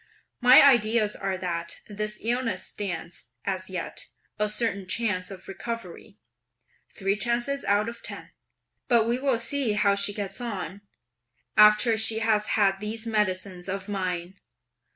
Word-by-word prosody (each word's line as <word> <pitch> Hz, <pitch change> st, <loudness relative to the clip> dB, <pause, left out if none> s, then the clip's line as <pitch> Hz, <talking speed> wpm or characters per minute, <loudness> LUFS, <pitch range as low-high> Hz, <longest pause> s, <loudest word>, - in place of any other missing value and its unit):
My 250 Hz, +2 st, +9 dB
ideas 225 Hz, -5 st, +4 dB
are 195 Hz, -1 st, -2 dB
that 170 Hz, -2 st, -4 dB
this 210 Hz, 0 st, -4 dB
illness 240 Hz, +1 st, -1 dB
stands, 175 Hz, -4 st, -5 dB, 0.2 s
as 190 Hz, -1 st, -3 dB
yet, 180 Hz, -2 st, -5 dB, 0.3 s
a 210 Hz, 0 st, +1 dB
certain 210 Hz, -3 st, 0 dB
chance 205 Hz, -3 st, -1 dB
of 195 Hz, -2 st, -10 dB
recovery, 215 Hz, 0 st, -7 dB, 0.7 s
(three 195 Hz, 0 st, -1 dB
chances 240 Hz, +6 st, -1 dB
out 205 Hz, +2 st, +2 dB
of 235 Hz, 0 st, -7 dB
ten); -, -, -7 dB, 0.6 s
but 235 Hz, -3 st, +4 dB
we 240 Hz, +2 st, 0 dB
will 270 Hz, -3 st, +1 dB
see 240 Hz, -1 st, 0 dB
how 210 Hz, -1 st, +3 dB
she 200 Hz, +1 st, +2 dB
gets 205 Hz, +3 st, -4 dB
on, 200 Hz, -5 st, -5 dB, 0.7 s
after 210 Hz, +2 st, +6 dB
she 220 Hz, 0 st, +4 dB
has 220 Hz, -2 st, +1 dB
had 195 Hz, -2 st, +3 dB
these 215 Hz, +2 st, -4 dB
medicines 190 Hz, -4 st, -2 dB
of 195 Hz, +1 st, -4 dB
mine. 185 Hz, -2 st, -3 dB
210 Hz, 140 wpm, -26 LUFS, 195-230 Hz, 0.7 s, My